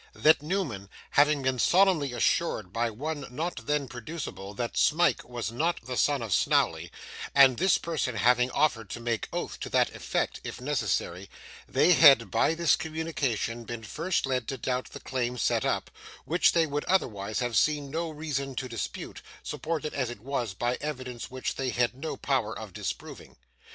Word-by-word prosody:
That, 155 -1 +4
Newman, 150 - -3 0.2
having 145 -1 +4
been 130 -1 0
solemnly 180 -6 +4
assured 120 - 0
by 115 0 0
one 145 +5 -5
not 135 -2 -4
then 145 -2 0
producible 120 - -7
that 120 +2 -3
Smike 170 +3 +3
was 120 -3 -4
not 165 +8 0
the 125 0 -4
son 140 -1 +2
of 110 -5 -2
Snawley, - - +2 0.4
and 135 -3 +7
this 190 +2 +4
person 155 -7 -2
having 125 +3 +3
offered 115 -7 +1
to 120 - -5
make 115 -1 -2
oath - - -4
to - - -5
that - - +2
effect, - - -2
if - - -6
necessary, 110 -9 -2 0.4
they 180 - +5
had 120 - +7
by 160 - +2
this 170 -1 +4
communication 155 -8 -2
been 115 -1 -6
first 165 - -1
led 130 -3 -1
to 135 - -3
doubt 125 +1 -2
the - - -9
claim 125 -1 -2
set - - +1
up, - - -1 0.3
which 170 +3 +3
they 165 -1 +4
would 145 -1 -2
otherwise 110 - 0
have 120 -2 -1
seen 145 0 +2
no 165 +2 -2
reason 145 -3 -4
to 130 - -3
dispute, 115 -2 -5 0.2
supported 155 -1 -3
as 130 -4 -1
it 120 -4 -8
was 120 -6 -3
by 120 +5 -1
evidence 130 -5 -5
which 130 0 -3
they 135 -1 -1
had 120 -1 +1
no 155 +5 -5
power 130 -6 -1
of 110 -4 -8
disproving. - - -6
130 Hz, 175 wpm, -28 LUFS, 120-155 Hz, 0.4 s, and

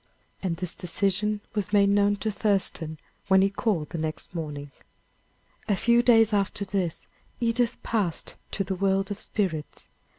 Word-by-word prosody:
And 175 -4 -1
this 180 0 -4
decision 205 +3 0
was 205 -2 -1
made 200 -1 +5
known 205 0 +3
to 215 +2 -2
Thurston 190 -7 +1 0.3
when 190 -1 +5
he 195 - +2
called 200 - -1
the 170 - -4
next 155 +2 -4
morning. 145 -4 -5 1.0
A 205 - +4
few 235 +4 +4
days 225 -3 +5
after 200 0 0
this 190 -4 -2 0.3
Edith 235 +1 +1
passed 200 -8 -1 0.2
to 195 - -1
the 190 - -3
world 195 +1 +1
of 205 - -4
spirits. 165 -8 -2
195 Hz, 155 wpm, -26 LUFS, 180-210 Hz, 1.0 s, made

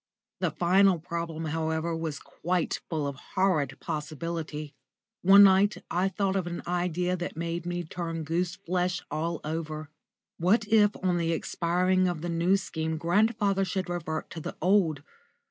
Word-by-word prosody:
The 180 - +1
final 185 +4 +4
problem, 165 -1 -4
however, 160 +1 -1
was 160 -3 -3
quite 175 +2 -2
full 155 -3 -1
of 140 -2 -4 0.2
horrid 155 -9 +1
possibility. 155 0 -4 0.5
One 195 +2 +8
night 195 +1 +5
I 185 +3 +2
thought 195 0 -1
of 185 -3 0
an 175 0 -5
idea 180 0 0
that 175 -3 -5
made 170 +1 -3
me 175 0 -2
turn 165 0 -4
goose 170 +3 -1
flesh 180 +1 -1
all 165 +1 -2
over. 155 -1 -4 0.5
What 205 +6 +3
if 210 -1 +4
on 180 -2 +2
the 165 -1 0
expiring 180 +3 +1
of 175 -3 -2
the 175 - -3
New 170 +3 +3
Scheme 160 -4 -3
grandfather 200 +3 +2
should 190 -1 -2
revert 160 -3 -3
to 165 - -6
the - - -6
old? 170 -5 +2
170 Hz, 155 wpm, -28 LUFS, 160-185 Hz, 0.5 s, One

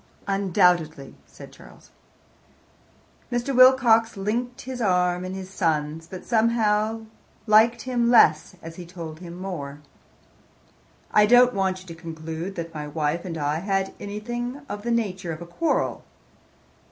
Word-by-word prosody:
"Undoubtedly," 175 -6 +1
said - - -13
Charles. - - -17 1.4
Mr. 245 +2 -1
Wilcox 245 -3 +5
linked 240 +6 -3
his 255 -1 -6
arm 180 -3 +1
in 185 +1 -5
his 190 0 -8
son's, 160 -3 -1
but 185 0 -9
somehow 220 -1 +1 0.4
liked 220 +2 +4
him 245 -2 0
less 185 -8 +4
as 165 0 -9
he 180 - -8
told 165 -3 -8
him 175 -1 -9
more. 150 -7 -6 1.3
"I 210 0 +5
don't 245 +2 +6
want 190 -2 -1
you - - -15
to 170 - -9
conclude 165 +2 -7
that 165 -1 -6
my 150 -1 -5
wife 150 +3 -2
and 170 -3 -5
I 150 +1 -1
had 195 +1 -1
anything 240 +6 -5
of 205 - -6
the 235 - -4
nature 195 -7 -1
of 155 - -8
a - - -9
quarrel. 175 - -1
190 Hz, 140 wpm, -24 LUFS, 165-230 Hz, 1.4 s, don't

